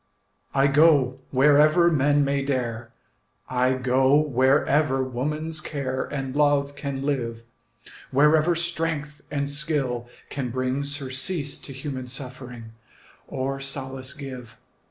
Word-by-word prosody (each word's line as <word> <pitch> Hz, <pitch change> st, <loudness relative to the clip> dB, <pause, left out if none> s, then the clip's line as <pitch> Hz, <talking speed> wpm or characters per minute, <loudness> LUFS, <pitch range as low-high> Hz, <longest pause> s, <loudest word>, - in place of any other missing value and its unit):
I 135 Hz, 0 st, +4 dB
go 140 Hz, -3 st, +4 dB
wherever 150 Hz, +5 st, +5 dB
men 145 Hz, -1 st, +3 dB
may 140 Hz, 0 st, 0 dB
dare, 120 Hz, -4 st, -2 dB, 0.6 s
I 125 Hz, 0 st, +1 dB
go 130 Hz, +1 st, +3 dB
wherever 140 Hz, 0 st, +2 dB
woman's 150 Hz, +5 st, -3 dB
care 130 Hz, -4 st, -3 dB
And 135 Hz, -2 st, -5 dB
love 145 Hz, -1 st, +2 dB
can 140 Hz, -1 st, -4 dB
live, 120 Hz, -5 st, -2 dB, 0.7 s
Wherever 155 Hz, +5 st, +4 dB
strength 165 Hz, -3 st, -3 dB
and 140 Hz, -1 st, -2 dB
skill 140 Hz, -5 st, -1 dB, 0.2 s
can 135 Hz, -3 st, -3 dB
bring 130 Hz, +3 st, -1 dB
Surcease 140 Hz, +2 st, -2 dB
to -, -, -10 dB
human 135 Hz, -1 st, -6 dB
suffering, 125 Hz, -3 st, -7 dB, 0.6 s
Or 135 Hz, +1 st, -3 dB
solace 135 Hz, 0 st, -3 dB
give. 130 Hz, -6 st, -9 dB
140 Hz, 115 wpm, -24 LUFS, 130-150 Hz, 0.7 s, wherever